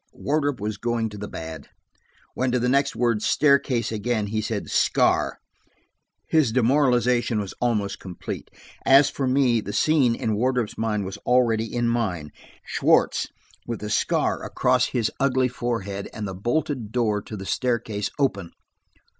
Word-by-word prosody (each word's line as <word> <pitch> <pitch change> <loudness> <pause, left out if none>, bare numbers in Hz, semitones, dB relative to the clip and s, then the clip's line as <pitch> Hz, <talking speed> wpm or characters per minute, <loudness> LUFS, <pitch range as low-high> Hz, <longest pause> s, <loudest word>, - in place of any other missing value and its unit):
Wardrop 145 -3 -1
was 105 +1 -3
going 115 -1 -1
to 105 - -9
the 105 - -5
bad. 80 -3 -8 0.6
When, 130 0 0
to - - +3
the 125 0 0
next 140 +2 +2
word, 120 -3 +1
"staircase," 140 -4 +2
again, 110 0 -1
he 110 +1 -2
said 110 -1 -3
"scar," - - +2 0.9
his 155 -8 +3
demoralization 125 -2 +2
was 100 -2 -4
almost 110 -5 0
complete. 90 -3 -7 0.3
As 135 +1 +6
for 135 - -2
me, 130 -3 +3
the 105 - -6
scene 140 -7 +3
in 110 - -1
Wardrop's 125 0 0
mind 105 -3 -1
was 95 - -6
already 115 -3 +1
in 120 -1 0
mine–Schwartz, 95 -11 0 0.4
with 115 -2 -4
the 105 0 -4
scar - - +1
across 125 -1 +2
his 115 -4 -1
ugly 130 -1 +2
forehead, 115 -6 -4
and 105 -2 -4
the 95 - -5
bolted 120 +2 -2
door 110 -4 +1
to 105 - -8
the 95 - -7
staircase 110 -3 -1
open! 100 -11 -1
115 Hz, 150 wpm, -24 LUFS, 105-125 Hz, 0.9 s, As